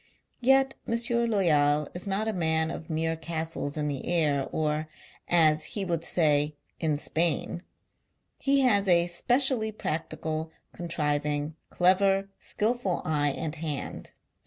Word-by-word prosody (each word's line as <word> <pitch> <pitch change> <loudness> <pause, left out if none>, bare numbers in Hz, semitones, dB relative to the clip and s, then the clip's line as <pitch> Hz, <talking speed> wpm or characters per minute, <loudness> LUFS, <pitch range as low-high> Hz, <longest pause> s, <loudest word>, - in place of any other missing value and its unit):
Yet 270 +1 +4
M. 230 - +1 0.3
Loyal 150 -7 +2
is 180 +3 -5
not 200 +3 -1
a 220 - 0
man 160 -3 0
of 160 - -8
mere 160 0 0
castles 160 -2 -4
in 150 -1 -1
the 140 -3 -4
air, 150 -6 +1
or, 155 0 -1 0.4
us 155 -3 +4
he 200 -2 -1
would 170 -2 -1
say, 150 -3 +2 0.2
in 155 -3 0
Spain. 165 +3 0 0.8
He 275 0 +2
has 205 -6 +3
a 170 -2 +5
I - - -3
specially 240 +5 +2
practical, 160 -3 -3 0.2
contriving, 150 -2 -2
clever, 195 +2 +3
skilful 215 -4 -1
i 150 -2 +1
eye - - +2
and 155 0 -4
hand. 150 -3 -5
165 Hz, 135 wpm, -28 LUFS, 150-195 Hz, 0.8 s, a